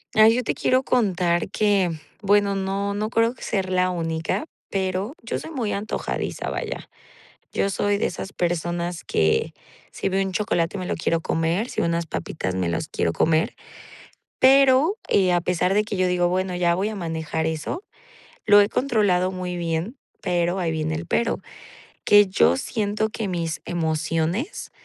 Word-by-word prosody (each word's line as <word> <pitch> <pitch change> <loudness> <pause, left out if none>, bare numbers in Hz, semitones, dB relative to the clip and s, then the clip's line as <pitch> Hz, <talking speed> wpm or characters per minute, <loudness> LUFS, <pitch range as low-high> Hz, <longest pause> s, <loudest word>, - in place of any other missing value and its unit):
Ay, 220 +1 +7
yo 250 - +1
te - - -1
quiero 255 0 +2
contar 185 -9 +1
que 200 -4 +2 0.3
Bueno, 200 0 +3
no 195 +1 -1
no 215 +1 -2
creo 230 +1 +2
que - - -12
ser 190 -3 -1
la 185 0 +2
única, 165 - -2 0.3
pero 190 +4 -1
yo 230 - -3
soy 320 - -8
muy 245 -9 -2
antojadiza, 205 +2 -3
vaya. - - -5 0.6
Yo 195 - 0
soy 205 +1 +1
de - - 0
esas 195 - -4
personas 175 -1 -2
que, 80 - +1 0.4
si - - -3
veo 195 0 +1
un 190 - -3
chocolate, 185 -2 0
me 185 - -4
lo - - -2
quiero 165 0 0
comer, 165 +7 0
si - - -2
veo - - +1
unas 170 0 0
papitas, 90 - -4
me 90 -2 0
las 85 - -2
quiero 85 - -1
comer. 160 - +1 0.8
Pero, 275 +7 +5
eh, 185 -2 +3
a 175 - +3
pesar 180 +1 +1
de 210 - +4
que 210 - -4
yo 185 -1 +2
digo: 180 -1 +2
"Bueno, 185 +1 -1
ya 175 -1 +2
voy 195 +4 0
a 220 - -5
manejar 160 -3 -3
eso", 160 - -3 0.6
lo 205 -1 +8
he 205 - +2
controlado 205 -9 +1
muy 180 -1 -4
bien, 170 +8 -2 0.2
pero 175 0 0
ahí 170 -3 0
viene 155 0 -2
el 160 +2 -4
pero. 235 +4 0 0.7
Que 205 0 +7
yo 85 - +3
siento 215 -1 -1
que 220 0 -4
mis 170 -3 -3
emociones 165 - -2
185 Hz, 175 wpm, -23 LUFS, 170-205 Hz, 0.8 s, lo